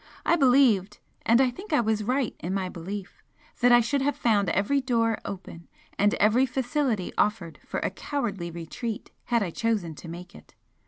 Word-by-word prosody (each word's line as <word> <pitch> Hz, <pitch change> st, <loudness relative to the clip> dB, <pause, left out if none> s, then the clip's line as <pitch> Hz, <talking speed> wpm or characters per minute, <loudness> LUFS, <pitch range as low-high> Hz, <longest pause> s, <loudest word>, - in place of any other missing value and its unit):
I -, -, +4 dB
believed, 245 Hz, -, +4 dB, 0.3 s
and 230 Hz, +2 st, +5 dB
I 260 Hz, -2 st, +4 dB
think 380 Hz, -, -11 dB
I 300 Hz, -, +4 dB
was 220 Hz, -2 st, 0 dB
right 255 Hz, +2 st, 0 dB
in 185 Hz, +3 st, -3 dB
my 190 Hz, -2 st, -1 dB
belief, 190 Hz, +3 st, -7 dB, 0.4 s
that 245 Hz, 0 st, +5 dB
I 240 Hz, 0 st, +7 dB
should 270 Hz, +4 st, 0 dB
have 285 Hz, 0 st, +1 dB
found 205 Hz, -5 st, +2 dB
every 275 Hz, +9 st, +1 dB
door 230 Hz, -4 st, +1 dB
open, 180 Hz, -3 st, -8 dB, 0.3 s
and 205 Hz, +1 st, +2 dB
every 230 Hz, +6 st, +3 dB
facility 250 Hz, -5 st, -1 dB
offered 185 Hz, -7 st, 0 dB
for -, -, -2 dB
a -, -, -1 dB
cowardly 220 Hz, -11 st, -3 dB
retreat 170 Hz, +7 st, -6 dB
had 235 Hz, -3 st, +1 dB
I 180 Hz, -, -3 dB
chosen 210 Hz, -6 st, -1 dB
to 160 Hz, -, -11 dB
make 175 Hz, +2 st, -9 dB
it. -, -, -16 dB
220 Hz, 180 wpm, -26 LUFS, 190-250 Hz, 0.4 s, I